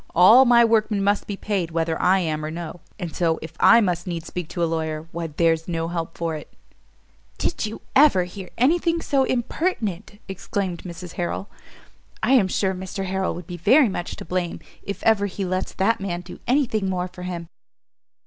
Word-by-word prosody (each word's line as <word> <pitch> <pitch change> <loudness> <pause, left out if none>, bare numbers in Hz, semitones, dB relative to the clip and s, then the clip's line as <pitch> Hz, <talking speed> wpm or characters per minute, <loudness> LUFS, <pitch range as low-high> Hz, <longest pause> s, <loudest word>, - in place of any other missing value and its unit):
All 220 +10 +8
my 235 -1 +6
workmen 215 -3 +2
must 205 +1 +1
be 200 - -4
paid 195 -6 -2
whether 165 -1 -1
I 185 +2 +4
am 155 -3 -2
or 155 - -3
no; 165 +1 -7 0.2
and 175 -5 -6
so, 165 -2 +1
if 160 0 -8
I 230 +1 +7
must 180 -3 -1
needs 170 -2 -4
speak 180 -1 -5
to 175 - -2
a - - +4
lawyer, 160 -1 -3
why 170 0 -4
there's 165 +1 +1
no 165 -1 -2
help 165 -1 -4
for 165 -1 -2
it." 150 - -9 0.9
"Did 275 - -1
you 215 - -8
ever 270 -10 +6
hear 180 +1 -8
any 290 +9 +4
thing 335 0 0
so 270 -2 +2
impertinent?" 225 - -2
exclaimed 190 -1 -3
Mrs 175 0 -8
Harrel; 180 +3 -3 0.7
"I - - +2
am 230 -8 +5
sure 190 +1 0
Mr 190 +1 -5
Harrel 190 0 -1
will 175 - -7
be 175 +1 -8
very 255 - +5
much 175 -2 -4
to - - -9
blame, 180 0 -2 0.2
if 200 - -6
ever 210 -2 +3
he 195 0 -4
lets 185 +1 -2
that 200 +4 +1
man 175 -3 -3
do - - -11
any 275 +3 +3
thing 215 -5 -1
more 180 -1 -1
for 180 0 -12
him." 175 -2 -5
185 Hz, 200 wpm, -23 LUFS, 170-210 Hz, 0.9 s, All